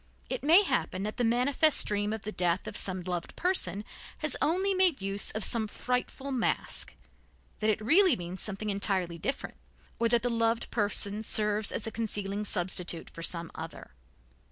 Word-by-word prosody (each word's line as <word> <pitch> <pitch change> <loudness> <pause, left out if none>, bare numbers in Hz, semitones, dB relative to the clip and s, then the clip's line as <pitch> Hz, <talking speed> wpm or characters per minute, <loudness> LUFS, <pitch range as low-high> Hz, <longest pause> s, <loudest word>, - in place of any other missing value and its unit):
It - - -2
may 335 +7 +7
happen 260 - -1
that 215 +1 -4
the 245 - 0
manifest 255 +6 +3
dream 205 0 -1
of 220 -1 -4
the 215 - -4
death 180 -1 0
of 215 -1 -6
some 185 -3 +1
loved 175 -1 -4
person 210 - -1 0.3
has 305 -1 -3
only 375 +5 +2
made 370 -7 +3
use 195 +1 0
of 215 - -3
some 220 0 +3
frightful 250 +4 -3
mask, 255 -3 -2 0.6
that 215 - +1
it 215 - +1
really 320 - +5
means 175 -1 -6
something 210 0 -2
entirely 190 -4 -1
different, 275 - -3 0.4
or 230 0 +2
that 235 0 +3
the 245 - 0
loved 230 0 0
person 205 -1 +1
serves 210 -1 +1
as - - -2
a 225 - -3
concealing 210 -2 -2
substitute 175 -3 -1
for 165 - -9
some 170 0 -3
other. 160 - -8
215 Hz, 175 wpm, -29 LUFS, 195-250 Hz, 0.6 s, may